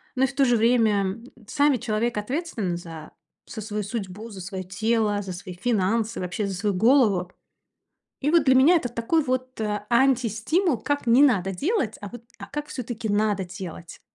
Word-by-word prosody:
Но 260 - +1
и - - 0
в 270 - -8
то 275 - +3
же 245 -2 +3
время, 230 -1 +3
м, 195 +4 -3 0.2
сами 285 0 +2
человек 235 -1 -1
ответственный 215 - -2
за 165 -3 -10 0.4
за 220 - -7
свою 210 0 -4
судьбу, 205 0 -6
за 190 - -8
своё 190 +1 -5
тело, 210 +2 0
за 190 -2 -6
свои 180 +1 -8
финансы, 220 +3 0
вообще 185 +3 -3
за 195 - -4
свою 205 +2 -1
голову. 205 -5 +3 0.9
И, 290 +2 +1
вот, 335 -3 +4
для 260 -2 +5
меня 280 +7 +6
это 280 -7 -1
такой, 240 +7 0
вот, 255 -1 -3
э, 210 -1 -2
антистимул, 255 - +2
как 285 -2 -2
не 240 +4 +6
надо 195 -8 +2
делать, 270 - -1
а, 205 - -6
вот, 240 +2 -10 0.2
а - - -8
как 295 0 -6
всё-таки 240 -3 -5
надо 205 -1 +1
делать. 180 -2 -9
220 Hz, 185 wpm, -24 LUFS, 195-255 Hz, 0.9 s, меня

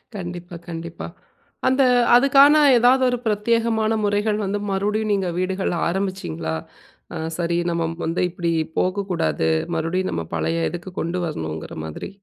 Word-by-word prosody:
கண்டிப்பா. 175 -1 -7
கண்டிப்பா. 170 0 -6 0.6
அந்த 260 +1 +4 0.3
அதுக்கான, 275 +3 +6 0.2
ஏதாவது 250 +3 +4
ஒரு 245 - 0
பிரத்யேகமான 220 +1 +1
முறைகள் 210 +1 +1
வந்து, 200 +2 -1
மறுபடியும் 210 +2 0
நீங்க 190 -3 0
வீடுகள்ல 185 -1 -1
ஆரம்பிச்சீங்களா? 175 - -3 0.6
ஆ. - - -3 0.2
சரி 170 0 0
நம்ம 170 -1 -1 0.2
வந்து 165 +2 -1
இப்படி 170 -1 -2 0.3
போகக்கூடாது. 180 - 0 0.3
மறுபடியும் 170 +4 -1
நம்ம 85 - -3
பழைய 80 0 0
இதுக்கு 175 +2 -7
கொண்டு 170 +2 -2
வரணும்ங்கிற 80 - -5
மாதிரி. 80 - -7
185 Hz, 130 wpm, -22 LUFS, 165-210 Hz, 0.6 s, அதுக்கான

